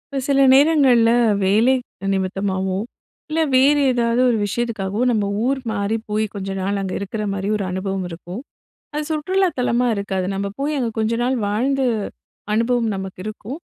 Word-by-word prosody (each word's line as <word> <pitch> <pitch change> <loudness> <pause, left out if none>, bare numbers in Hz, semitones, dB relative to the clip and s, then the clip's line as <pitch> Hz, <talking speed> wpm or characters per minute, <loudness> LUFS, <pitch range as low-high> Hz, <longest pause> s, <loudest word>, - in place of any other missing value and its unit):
இப்ப 265 - -1
சில 275 0 +4
நேரங்கள்ல 270 -5 +5 0.3
வேலை 220 +7 +4 0.4
நிமித்தமாவோ, 190 0 -1 0.5
இல்லை 320 +1 +1
வேறு 275 +3 +5
ஏதாவது 235 0 +1
ஒரு 235 - +2
விஷயத்துக்காகவோ, 205 -2 -2
நம்ம 215 -3 +1 0.2
ஊர் 270 +1 +1
மாறி 200 0 -1
போய் 215 +1 0
கொஞ்ச 195 -2 -5
நாள் 200 +2 -1
அங்க 190 -1 -3
இருக்கிற 205 +2 -4
மாரி, 195 0 -3
ஒரு 210 - -2
அனுபவம் 190 0 -3
இருக்கும். 175 +5 -8 0.5
அது 300 - -1
சுற்றுலா 370 +5 +1
தலமா 245 0 +1
இருக்காது. 195 -2 -2
நம்ப 200 +1 -2
போய் 295 +2 0
அங்கே 240 -3 -1
கொஞ்ச 220 +1 +1
நாள், 255 +2 +1
வாழ்ந்த 260 +7 0 0.7
அனுபவம் 230 +1 +1
நமக்கு 190 -1 -7
இருக்கும். 215 +6 -6
220 Hz, 155 wpm, -21 LUFS, 195-260 Hz, 0.7 s, நேரங்கள்ல